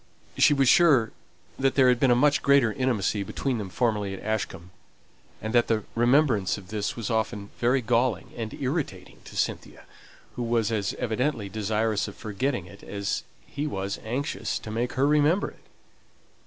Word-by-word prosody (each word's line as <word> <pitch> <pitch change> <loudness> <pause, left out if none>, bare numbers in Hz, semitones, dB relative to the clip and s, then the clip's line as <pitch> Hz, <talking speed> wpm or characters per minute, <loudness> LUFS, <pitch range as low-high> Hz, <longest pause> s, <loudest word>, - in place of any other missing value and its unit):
She 145 - +5
was 135 -2 +3
sure 135 -8 +5 0.5
that 135 0 +2
there 130 -2 +5
had 125 -1 +4
been 135 - +3
a 120 - +5
much 145 +3 +3
greater 140 -6 +4
intimacy 115 -6 0
between 125 +5 -2
them 100 -3 -5
formerly 105 0 -1
at - - -11
Ashcombe, 95 -5 -3 0.7
and 110 +1 -3
that 120 -1 +4
the 110 -2 0
remembrance 120 -5 +3
of 95 -2 -12
this 105 -1 -2
was 115 -2 -4
often 110 -2 -2
very 125 +3 +2
galling 115 -4 0
and 115 -2 -4
irritating 130 - -4
to - - -10
Cynthia, - - -3 0.5
who - - -4
was 115 -2 +1
as 105 -3 -1
evidently 115 -2 -1
desirous 110 +1 0
of 100 - -9
forgetting 110 -1 -2
it 95 +2 -14
as 100 -1 -3 0.2
he 145 +2 -4
was 100 -5 -3
anxious 135 +8 -2
to 110 - -8
make 120 +3 -2
her 135 +1 +2
remember 150 +6 +3
it. - - -23
115 Hz, 170 wpm, -26 LUFS, 105-130 Hz, 0.7 s, She